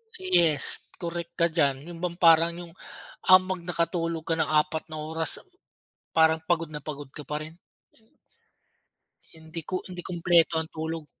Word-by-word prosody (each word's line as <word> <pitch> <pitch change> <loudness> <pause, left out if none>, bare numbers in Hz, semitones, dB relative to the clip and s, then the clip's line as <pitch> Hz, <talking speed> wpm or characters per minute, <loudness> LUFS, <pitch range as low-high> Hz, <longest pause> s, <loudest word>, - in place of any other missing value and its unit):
Yes, 170 - +3 0.2
correct 170 0 -5
ka 170 -1 +2
diyan, 145 -1 0
yung 170 - -10
bang 175 -1 -2
parang 165 0 +5
yung 175 -1 -9 0.5
habang 185 -1 +4
nakatulog 170 -1 -1
ka 165 - +1
ng - - +1
4 155 +1 +1
na 155 - -5
oras, 160 +1 0 0.8
parang 160 0 +5
pagod 165 -2 0
na 150 - -4
pagod 145 -1 -8
ka 150 - -9
pa 150 0 -4
rin. 160 +2 -13 1.8
Hindi 160 +1 -9
ko 185 - -2
hindi 180 -1 -7
kumpleto 170 -1 +2
ang 160 - -8
tulog. 160 0 -4
165 Hz, 150 wpm, -26 LUFS, 155-170 Hz, 1.8 s, parang